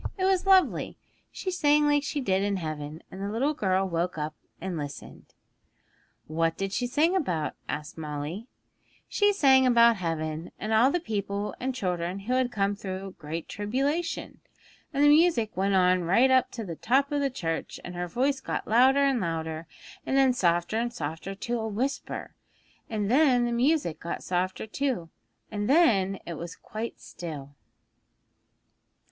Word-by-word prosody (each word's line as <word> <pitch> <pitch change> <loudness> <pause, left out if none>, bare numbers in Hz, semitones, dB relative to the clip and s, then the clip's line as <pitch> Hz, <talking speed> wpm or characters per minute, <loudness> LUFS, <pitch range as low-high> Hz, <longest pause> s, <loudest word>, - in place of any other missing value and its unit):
It 375 - 0
was 380 0 +2
lovely. 380 -1 +3 0.3
She 375 - -4
sang 295 -4 +3
like 290 0 +3
she 290 0 -3
did 190 -5 +1
in 200 0 0
heaven, 155 -1 -5
and 190 - -8
the 200 - -2
little 260 +8 0
girl 190 -6 +1
woke 175 0 -2
up 150 0 -3 0.3
and 185 +1 -4
listened.' 145 -3 -8 0.9
'What 165 +1 0
did 195 0 -3
she 245 +3 0
sing 310 +8 +2
about?' 175 - -1 0.2
asked 150 +2 -5
Molly. 155 - -5 0.6
'She 410 0 +3
sang 265 -9 +5
about 235 -2 +6
heaven, 160 -2 -3
and 215 +2 -3
all 230 +4 +5
the 350 - 0
people 205 - -3
and 260 0 -2
children 180 -3 -2
who 235 +6 -2
had 255 -1 +1
come 200 -2 0
through 190 -1 -6
great 160 +2 -5
tribulation. 275 +11 -2 0.5
And 280 - +1
the - - +7
music 295 -8 +4
went 195 +2 +1
on 180 -1 +4
right 235 +10 +4
up 260 -1 +4
to 230 -3 -5
the 170 -3 -5
top 270 - +1
of 290 -1 0
the 280 - +1
church, 165 -10 -4
and 175 - -7
her 175 0 -3
voice 265 +8 0
got - - -4
louder 260 +5 +5
and 270 -3 +2
louder, 160 -2 -3 0.4
and 270 - 0
then 265 -2 +5
softer 175 -1 +1
and 240 +1 -1
softer 165 +1 -5
to 235 +4 -3
a 220 - -2
whisper, 250 +7 -3 0.6
and 210 -2 -1
then 260 -3 +4
the 240 - -1
music 245 - +1
got 170 - -5
softer 185 +2 -1
too, 220 - -2 0.4
and 205 +1 -2
then 205 - +4
it 170 -3 -6
was 170 0 -6
quite 220 +2 -6
still.' 145 -5 -8
205 Hz, 170 wpm, -27 LUFS, 175-265 Hz, 0.9 s, the